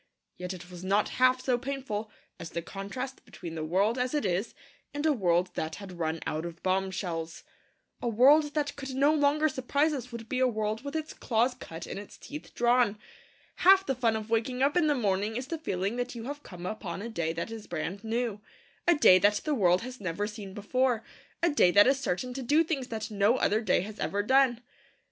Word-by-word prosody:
Yet 180 Hz, 0 st, -5 dB
it 180 Hz, -1 st, -9 dB
was 180 Hz, 0 st, -9 dB
not 200 Hz, +2 st, +2 dB
half 255 Hz, 0 st, +4 dB
so 250 Hz, -2 st, +1 dB
painful 250 Hz, -5 st, -4 dB, 0.3 s
as 165 Hz, -, -7 dB
the 170 Hz, 0 st, -4 dB
contrast 205 Hz, +9 st, -6 dB
between 170 Hz, -3 st, -9 dB
the 160 Hz, -1 st, -4 dB
world 200 Hz, +9 st, +1 dB
as 250 Hz, +3 st, 0 dB
it 295 Hz, -, 0 dB
is 190 Hz, +4 st, -1 dB, 0.4 s
and 290 Hz, +1 st, -2 dB
a 310 Hz, -, +4 dB
world 180 Hz, -5 st, +1 dB
that 160 Hz, -1 st, -3 dB
had 190 Hz, -4 st, -10 dB
run 160 Hz, 0 st, -1 dB
out 155 Hz, +1 st, -2 dB
of 170 Hz, 0 st, -8 dB
bombshells. 185 Hz, -3 st, -2 dB, 0.6 s
A 245 Hz, -, -2 dB
world 290 Hz, +7 st, +5 dB
that 290 Hz, -1 st, -1 dB
could 270 Hz, -2 st, -6 dB
no 285 Hz, +3 st, +4 dB
longer 300 Hz, +1 st, +3 dB
surprise 285 Hz, +3 st, +1 dB
us 250 Hz, -3 st, -5 dB
would 230 Hz, -1 st, -7 dB
be 255 Hz, -, -2 dB
a 260 Hz, -, +4 dB
world 215 Hz, 0 st, -2 dB
with 285 Hz, +2 st, -6 dB
its 315 Hz, 0 st, -3 dB
claws 235 Hz, +2 st, +1 dB
cut 165 Hz, -9 st, -9 dB
and -, -, -6 dB
its 205 Hz, -, -11 dB
teeth 300 Hz, +1 st, -9 dB
drawn. 240 Hz, -3 st, +3 dB, 0.6 s
Half 385 Hz, +1 st, +6 dB
the 270 Hz, -, 0 dB
fun 235 Hz, -3 st, +1 dB
of 220 Hz, 0 st, -5 dB
waking 250 Hz, +3 st, +1 dB
up 285 Hz, +3 st, +2 dB
in 345 Hz, -3 st, +3 dB
the 295 Hz, -, +3 dB
morning 210 Hz, -2 st, 0 dB
is 250 Hz, +2 st, -3 dB
the 325 Hz, +4 st, -4 dB
feeling 195 Hz, -, -2 dB
that 245 Hz, 0 st, -3 dB
you 230 Hz, -, -6 dB
have 290 Hz, +4 st, -6 dB
come 180 Hz, -7 st, -10 dB
upon 195 Hz, -2 st, -5 dB
a -, -, -4 dB
day 170 Hz, -7 st, -1 dB
that 170 Hz, +7 st, -4 dB
is 225 Hz, -2 st, -8 dB
brand 175 Hz, +4 st, -4 dB
new, 225 Hz, -2 st, -2 dB, 0.5 s
a 345 Hz, -, +6 dB
day 185 Hz, -10 st, +7 dB
that 205 Hz, +2 st, +3 dB
the 305 Hz, -, 0 dB
world 185 Hz, -6 st, +3 dB
has 255 Hz, -2 st, -8 dB
never 185 Hz, +2 st, -2 dB
seen 210 Hz, -2 st, -8 dB
before, 240 Hz, +2 st, 0 dB, 0.4 s
a 345 Hz, -, +5 dB
day 290 Hz, -11 st, +5 dB
that 205 Hz, +3 st, +7 dB
is 270 Hz, +1 st, +3 dB
certain 250 Hz, +2 st, -2 dB
to 270 Hz, -, -5 dB
do 295 Hz, +6 st, +3 dB
things 285 Hz, -6 st, -2 dB
that 220 Hz, -1 st, -5 dB
no 210 Hz, +4 st, +3 dB
other 215 Hz, -3 st, +2 dB
day 220 Hz, -, +2 dB
has 210 Hz, +3 st, -8 dB
ever 205 Hz, +1 st, -1 dB
done. 260 Hz, 0 st, +3 dB
225 Hz, 220 wpm, -29 LUFS, 190-265 Hz, 0.6 s, day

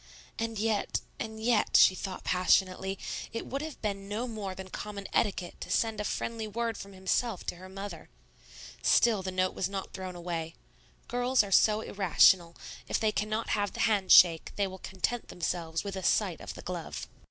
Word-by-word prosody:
And 225 Hz, 0 st, -2 dB
yet, 215 Hz, 0 st, 0 dB, 0.2 s
and 220 Hz, 0 st, -5 dB
yet, 225 Hz, 0 st, +3 dB
she -, -, +7 dB
thought 185 Hz, 0 st, -6 dB
passionately, 185 Hz, +1 st, +2 dB, 0.3 s
it 230 Hz, -, -4 dB
would 275 Hz, +1 st, -4 dB
have 315 Hz, -1 st, -6 dB
been 200 Hz, -1 st, -3 dB
no 225 Hz, +4 st, -2 dB
more 205 Hz, -5 st, -5 dB
than 190 Hz, -1 st, -9 dB
common 205 Hz, -1 st, -6 dB
etiquette 190 Hz, -4 st, -1 dB
to -, -, -6 dB
send 225 Hz, -2 st, +1 dB
a -, -, -2 dB
friendly 225 Hz, +1 st, -3 dB
word 230 Hz, +1 st, -2 dB
from 200 Hz, 0 st, -9 dB
himself 190 Hz, +2 st, -1 dB
to -, -, -4 dB
her 185 Hz, +1 st, -11 dB
mother. 195 Hz, +2 st, -8 dB, 0.7 s
Still 225 Hz, -4 st, +4 dB
the 190 Hz, -, -4 dB
note 185 Hz, 0 st, 0 dB
was 185 Hz, -, -2 dB
not 195 Hz, -1 st, -5 dB
thrown 185 Hz, -1 st, -6 dB
away. 170 Hz, -2 st, -4 dB, 0.5 s
Girls 245 Hz, 0 st, +2 dB
are 200 Hz, -, -7 dB
so 215 Hz, +2 st, +5 dB
irrational; 180 Hz, -3 st, +4 dB, 0.3 s
if -, -, 0 dB
they 220 Hz, -1 st, +2 dB
cannot 215 Hz, +2 st, -2 dB
have 205 Hz, -1 st, 0 dB
the -, -, -3 dB
hand 205 Hz, -5 st, +2 dB
shake, 165 Hz, -3 st, +7 dB
they 200 Hz, -, +1 dB
will 190 Hz, 0 st, -7 dB
content 190 Hz, +7 st, -3 dB
themselves 165 Hz, -1 st, -3 dB
with 200 Hz, -1 st, -5 dB
a 190 Hz, -, -4 dB
sight -, -, +1 dB
of -, -, -7 dB
the -, -, -10 dB
glove. -, -, -5 dB
200 Hz, 185 wpm, -30 LUFS, 185-220 Hz, 0.7 s, she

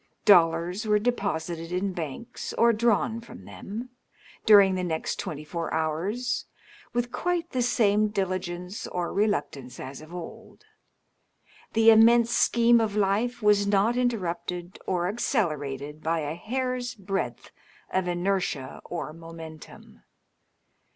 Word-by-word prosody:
Dollars 175 Hz, +1 st, +4 dB
were 210 Hz, 0 st, +4 dB
deposited 175 Hz, -7 st, -2 dB
in 185 Hz, +2 st, -1 dB
banks 170 Hz, -, -6 dB
or 235 Hz, 0 st, +4 dB
drawn 230 Hz, 0 st, +1 dB
from 230 Hz, -, -12 dB
them, 235 Hz, +5 st, -7 dB, 0.6 s
during 200 Hz, -3 st, +8 dB
the 185 Hz, -1 st, -1 dB
next 160 Hz, -3 st, -2 dB
twenty 150 Hz, 0 st, -5 dB
four 165 Hz, +2 st, -4 dB
hours, 165 Hz, +10 st, -1 dB, 0.5 s
with 240 Hz, 0 st, -1 dB
quite 350 Hz, -1 st, -1 dB
the 255 Hz, -, 0 dB
same 215 Hz, -3 st, +3 dB
dil^nce 185 Hz, -1 st, -3 dB
or 175 Hz, -1 st, -2 dB
reluctance 145 Hz, -, -1 dB
as 135 Hz, +2 st, -7 dB
of 155 Hz, +1 st, -13 dB
old. 175 Hz, -2 st, -10 dB, 1.1 s
The 225 Hz, 0 st, +7 dB
immense 230 Hz, +1 st, +6 dB
scheme 235 Hz, 0 st, +4 dB
oi 225 Hz, -, +2 dB
life 210 Hz, +4 st, 0 dB
was 205 Hz, -1 st, +4 dB
not 205 Hz, +4 st, +3 dB
interrupted 180 Hz, -7 st, -2 dB
or 180 Hz, -1 st, 0 dB
accelerated 150 Hz, -, -2 dB
by 165 Hz, 0 st, 0 dB
a 150 Hz, 0 st, -3 dB
hair's 250 Hz, +6 st, -3 dB
breadth 195 Hz, -2 st, -4 dB, 0.4 s
of 185 Hz, -1 st, +1 dB
inertia 175 Hz, -6 st, -2 dB
or 170 Hz, -3 st, -5 dB
momentum. 165 Hz, -1 st, -11 dB
195 Hz, 125 wpm, -27 LUFS, 165-225 Hz, 1.1 s, during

